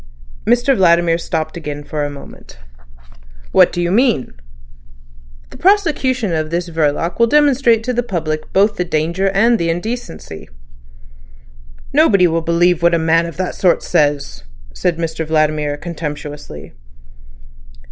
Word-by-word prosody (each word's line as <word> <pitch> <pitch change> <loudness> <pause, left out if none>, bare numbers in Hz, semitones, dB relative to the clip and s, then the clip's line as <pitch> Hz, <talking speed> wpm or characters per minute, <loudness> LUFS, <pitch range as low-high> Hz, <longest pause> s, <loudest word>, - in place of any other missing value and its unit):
Mr 245 +4 +3
Vladimir 170 -3 +3
stopped 160 -2 -3
again 150 -3 -6
for 150 +1 -4
a 145 - -2
moment. 140 - -13 0.9
"What - - +5
do - - -4
you 175 0 0
mean?" 230 - +1 1.2
"The - - -12
prosecution 275 - +1
of 155 -1 -2
this 170 +1 -3
Verloc 160 +2 -1
will 235 - +5
demonstrate 260 -5 +3
to 250 +2 -2
the 245 - 0
public 160 -8 -4
both 205 +2 +2
the 180 - 0
danger 170 +3 -1
and 225 +4 +2
the 170 - -1
indecency." 175 - -5 1.4
"Nobody 195 -4 +4
will 165 -1 +1
believe 170 +1 +1
what 170 0 +3
a - - +2
man 165 +1 +2
of 170 - -9
that 185 0 -2
sort 180 -2 +1
says," 145 - 0 0.3
said 170 - -1
Mr 165 -1 -3
Vladimir 155 -2 0
contemptuously. 150 - -7
170 Hz, 135 wpm, -17 LUFS, 155-205 Hz, 1.4 s, What